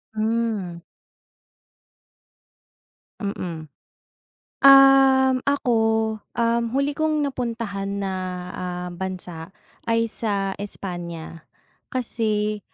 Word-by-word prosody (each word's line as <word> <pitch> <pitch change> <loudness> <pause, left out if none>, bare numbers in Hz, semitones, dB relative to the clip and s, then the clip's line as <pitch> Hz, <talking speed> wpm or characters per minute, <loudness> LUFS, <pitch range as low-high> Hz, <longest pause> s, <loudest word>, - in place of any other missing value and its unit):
Hmm. 215 -5 -1 2.4
Mm. 170 -6 -5 0.9
Um, 270 -1 +7
ako, 280 -3 +1 0.6
um, 235 0 +2
huli 280 +1 +1
kong 310 -1 +1
napuntahan 225 -7 -3
na, 195 - -2 0.4
ah, 180 0 -5
bansa, 180 -2 -6 0.3
ay 230 0 +2
sa 200 -3 -1
Espanya. 175 -5 -7 0.4
Kasi 215 -4 -1
215 Hz, 70 wpm, -23 LUFS, 185-250 Hz, 2.4 s, Um